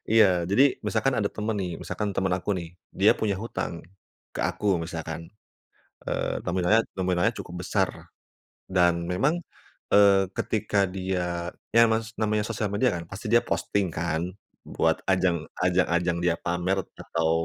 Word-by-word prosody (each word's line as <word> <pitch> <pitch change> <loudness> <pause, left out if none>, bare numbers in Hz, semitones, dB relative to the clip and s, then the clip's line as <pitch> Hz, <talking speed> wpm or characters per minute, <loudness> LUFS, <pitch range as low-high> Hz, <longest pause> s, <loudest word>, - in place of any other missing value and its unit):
Iya, 95 -6 +5
jadi 105 +7 +5 0.2
misalkan 115 +4 +1
ada 100 -2 +1
temen 110 +1 -2
nih, 90 -2 -2
misalkan 105 - -3
temen 95 -1 +1
aku 95 - -4
nih. 85 -1 -6 0.3
Dia 100 +3 +6
punya 105 -2 0
hutang 115 - -3 0.6
ke - - -3
aku - - -4 0.2
misalkan. 80 -1 -5 0.9
Eee, - - -1
nominalnya 90 +5 +3 0.2
nominalnya 95 +4 +2
cukup 90 -1 -7
besar - - +1 0.8
dan 90 -2 +4 0.2
memang, 135 - +2 0.6
eee, 100 -2 +6
ketika 105 -2 +1
dia 90 -2 -2 0.2
ya 115 - +7
Mas 110 0 -1
namanya 105 -1 +1
sosial 110 -2 -2
media 120 +5 +2
kan 85 - -5
pasti 100 +4 -7
dia 120 - +6
posting 100 -1 0
kan 80 0 -1 0.4
buat - - +1
ajang 90 -2 +3 0.3
ajang-ajang 90 -1 +2
dia 85 -1 +3
pamer 90 +2 -1 0.2
atau 80 -1 0
95 Hz, 145 wpm, -26 LUFS, 90-105 Hz, 0.9 s, ya